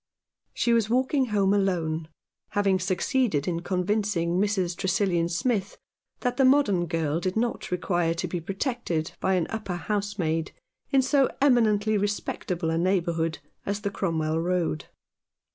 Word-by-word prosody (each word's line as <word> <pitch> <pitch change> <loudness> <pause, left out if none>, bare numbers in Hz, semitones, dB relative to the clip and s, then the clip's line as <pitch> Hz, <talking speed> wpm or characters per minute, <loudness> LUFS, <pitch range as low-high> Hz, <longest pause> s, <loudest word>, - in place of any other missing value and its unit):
She 235 - +2
was 225 -2 +2
walking 260 +2 +2
home 200 -3 +2
alone, 165 -5 0 0.5
having 195 -2 +2
succeeded 185 - 0
in 170 -2 0
convincing 180 -1 0
Mrs. 190 -4 0
Tresillian 185 -2 +1
Smith 200 +2 -1 0.4
that 250 -1 -1
the 270 - +4
modern 255 -10 +4
girl 165 -2 0
did 185 +1 -2
not 235 +1 -1
require 175 -2 0
to 165 - -2
be 175 - -3
protected 195 - -2
by 190 - +1
an 175 -3 +1
upper 215 -5 -3
housemaid 185 -5 -2 0.4
in 270 -2 +4
so 270 0 +3
eminently 215 -6 +3
respectable 185 -4 -2
a 165 - 0
neighbourhood 170 -3 0 0.3
as 200 +1 -3
the 200 - -2
Cromwell 160 -5 -1
Road. 170 -4 -1
190 Hz, 140 wpm, -26 LUFS, 170-215 Hz, 0.5 s, the